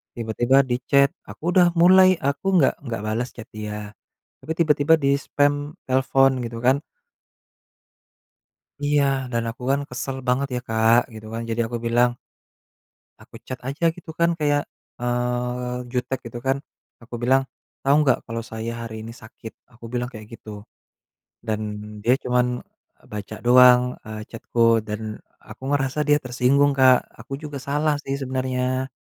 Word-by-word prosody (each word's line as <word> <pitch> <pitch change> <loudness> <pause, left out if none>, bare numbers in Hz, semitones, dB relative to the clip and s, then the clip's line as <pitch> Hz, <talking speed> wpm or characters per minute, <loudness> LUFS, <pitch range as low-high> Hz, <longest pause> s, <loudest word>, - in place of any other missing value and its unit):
Tiba-tiba 120 +3 +1
di 120 - +2
chat, 140 0 +5 0.2
aku - - -12
udah 180 -2 +6
mulai, 185 +1 +7 0.2
aku 140 +6 -2
nggak 140 - +4
nggak 115 -3 -3
bales 115 +4 -2
chat 115 +2 -9
dia. 105 -1 -6 0.5
Tapi 160 - -7
tiba-tiba 150 -1 +4
dispam 140 +1 +2 0.3
telepon 135 +1 +3
gitu 115 0 -5
kan 130 +2 +5 2.1
Iya, 145 0 +3 0.3
dan 115 0 0
aku 125 +2 -12
kan 140 +1 +2
kesel 130 +2 -4
banget 135 +2 +1
ya - - -2
Kak, 110 +1 +4 0.2
gitu 110 0 -10
kan. 115 +1 -4
Jadi 115 +1 -1
aku 120 0 -4
bilang 120 +1 +3 1.1
aku - - -21
chat 130 -1 -5
aja 145 +5 -3
gitu 175 -2 -10
kan 170 0 +4
kayak, 145 -1 +2 0.4
eee, 125 0 -2
jutek 125 +1 -2
gitu 120 +1 -7
kan. 135 +1 +2 0.5
Aku 115 - -11
bilang, 130 +2 +4 0.4
"Tahu 140 +1 +3
nggak, 130 -4 +3
kalau 115 0 -4
saya 110 +1 -4
hari 110 - -8
ini 115 - -8
sakit?" 110 0 -11 0.2
aku 120 0 -16
bilang 120 0 -1
kayak 110 -1 -10
gitu. 105 -2 -10 0.8
Dan, 110 -1 -1 0.4
dia 120 +3 +4
cuman, 125 0 +2 0.7
baca 105 +1 -6
doang, 125 0 +8 0.2
eee, 110 0 -6
chat-ku 115 0 +2
dan, 110 0 -5 0.2
aku - - -13
ngerasa 135 +1 -1
dia 150 0 +4
tersinggung 130 +3 +3
Kak. 130 -1 +7 0.2
Aku 135 - -8
juga 145 -2 -6
salah 150 +1 +1
sih 135 - -3
sebenarnya. 130 0 -1
125 Hz, 150 wpm, -23 LUFS, 115-140 Hz, 2.1 s, doang